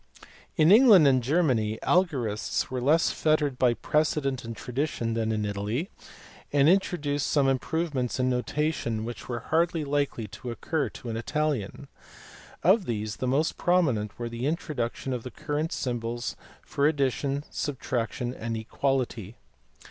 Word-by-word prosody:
In 155 +3 +5
England 210 - +8
and 130 -2 +4
Germany 125 -7 +1
algorists 130 - 0
were 130 -1 -2
less 155 +6 +3
fettered 150 -4 +1
by 120 -2 +3
precedent 145 -3 0
and 115 -1 -7
tradition 125 -3 -2
than 110 -1 0
in 105 -1 -1
Italy, 105 - -3 0.6
and 140 0 +4
introduced 150 -6 +1
some 140 -2 +3
improvements 135 -1 -1
in 130 - +2
notation 125 -3 -1
which 120 +2 -7
were 120 -2 -3
hardly 165 0 +2
likely 140 -5 -1
to 120 +5 -8
occur 145 +5 -2
to 120 - -7
an 110 - -3
Italian. 140 -1 -2 0.8
Of 190 +2 +4
these 110 -3 -3
the 130 - -2
most 145 +6 +1
prominent 130 - +1
were 120 - -4
the 115 +3 -3
introduction 135 -5 -2
of 125 - -3
the 125 - -7
current 150 +5 -3
symbols 120 -1 -3 0.3
for 140 +1 +1
ad 155 - -3
dition, 140 +1 0
subtraction, 125 -3 -3
and 115 -2 -4
equality. 120 -2 -2
130 Hz, 145 wpm, -27 LUFS, 115-155 Hz, 0.8 s, England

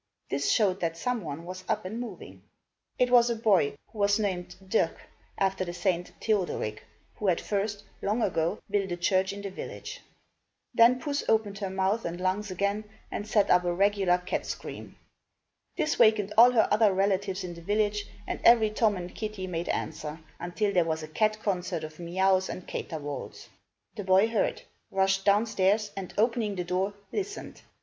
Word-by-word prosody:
This 140 +1 0
showed 195 -4 +3
that 165 -2 -2
some 245 +4 -2
one 155 +1 -6
was 185 +1 -7
up - - 0
and 215 +5 -4
moving. 245 -1 -8 0.6
It 250 -1 +2
was 240 -1 +6
a 235 - 0
boy, 200 -11 +3 0.2
who 215 - -11
was 205 +1 +4
named 185 -5 -2
Dirck, 220 - +1 0.4
after 195 -1 +1
the 175 -1 -5
saint 175 -1 -1
Theodoric, 185 - -1 0.4
who 210 - -2
had 180 - +3
first, 205 0 -2 0.2
long 215 +4 0
ago, 165 +1 0
built 200 -2 0
a 175 - -2
church 185 +2 +2
in 200 0 -7
the 200 - -4
village. - - -7 0.7
Then 235 +2 +6
Puss 285 0 -2
opened 210 -3 +1
her 195 -2 -2
mouth 190 +4 0
and 170 +1 -4
lungs 190 +3 -1
again 200 +3 -1 0.3
and 205 - -4
set 210 -2 +3
up 180 0 +5
a 175 - 0
regular 195 -1 +3
cat 180 0 -3
scream. - - -7 0.8
This 315 -3 0
wakened 210 -2 +4
all 235 +2 +9
her 235 -3 +3
other 215 -1 +5
relatives 195 0 0
in 175 -1 -5
the 170 - -11
village 205 +2 0 0.2
and - - -4
every 225 -2 +6
Tom 215 -2 +2
and 180 0 -7
Kitty 215 -3 -4
made 175 -1 -3
answer, 155 0 -3 0.2
until 200 +4 -1
there 180 -2 +4
was 160 -1 -2
a - - -6
cat 215 +7 +1
concert 180 -4 -1
of 155 +1 -8
meouws 190 +2 +2
and 185 - -6
caterwauls. 145 -4 -6 0.5
The 205 - -4
boy 190 +3 +4
heard, 225 -3 0 0.3
rushed 195 0 +1
down 205 +2 +4
stairs, 210 0 +1
and, 190 -2 -6
opening 225 -2 +1
the 180 - -2
door, 185 +3 -1 0.2
listened. 405 +1 -5
195 Hz, 180 wpm, -28 LUFS, 180-215 Hz, 0.8 s, all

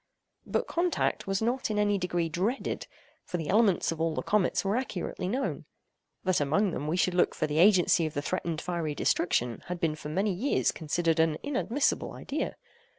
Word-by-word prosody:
But - - 0
contact 345 - 0
was 195 +2 0
not 245 +2 0
in 210 - -1
any 205 -1 +2
degree 175 -2 0
dreaded; 190 - -2 0.4
for 180 - -4
the 160 -3 -4
elements 205 -4 +3
of 165 -1 -4
all 165 -1 0
the - - -2
comets 205 -2 +1
were 195 +2 +1
accurately 195 -7 -3
known. 260 +7 -2 0.6
That 185 -4 +2
among 160 +8 +2
them 150 - -4
we 165 +4 0
should 185 0 +2
look 180 - +2
for - - 0
the 150 +1 -1
agency 175 -3 +5
of 155 - -8
the 145 - 0
threatened 170 -3 -2
fiery 170 -4 -2
destruction 120 -9 +1
had 180 0 -4
been 165 -2 +1
for 155 -1 -7
many 195 +5 0
years 245 +11 +1
considered 165 +1 0
an 160 -1 +3
inadmissible 280 -1 0
idea. 290 +2 -3
180 Hz, 190 wpm, -29 LUFS, 160-210 Hz, 0.6 s, agency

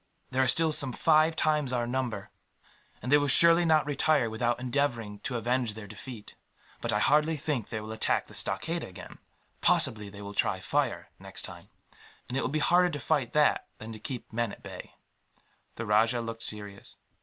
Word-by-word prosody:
"There 130 - +1
are 130 - +3
still 160 +5 +3
some 135 -4 0
five 155 +1 +3
times 150 -5 +1
our 120 -1 0
number, 120 -5 -3 0.7
and 125 - -3
they 145 - +7
will 145 - 0
surely 170 +5 +8
not 155 -2 +3
retire 145 -4 +1
without 120 +2 -1
endeavouring 120 -5 -2
to 125 - -5
avenge 120 -1 -1
their 110 -1 -8
defeat. 110 +1 -10 0.5
But - - -2
I - - +1
hardly 150 +2 +2
think 145 -6 -3
they 110 - -4
will 110 +1 -8
attack 110 - 0
the - - -16
stockade 165 - -1
again. 90 - -11 0.4
Possibly 105 -2 +2
they 100 +1 -11
will 100 0 -7
try - - 0
fire, - - -2
next - - -7
time; - - -9 0.6
and 125 - -5
it 135 - 0
will - - -1
be 150 - -1
harder 175 +4 +3
to 150 -4 -5
fight 135 -3 -1
that 150 -1 +2
than 110 +1 -9
to 110 - -10
keep 125 -1 -7
men 120 -1 -1
at - - -13
bay." - - -10 0.8
The 115 - -5
rajah 110 +3 +2
looked 115 0 -6
serious. 105 -2 -3
125 Hz, 190 wpm, -28 LUFS, 110-150 Hz, 0.8 s, surely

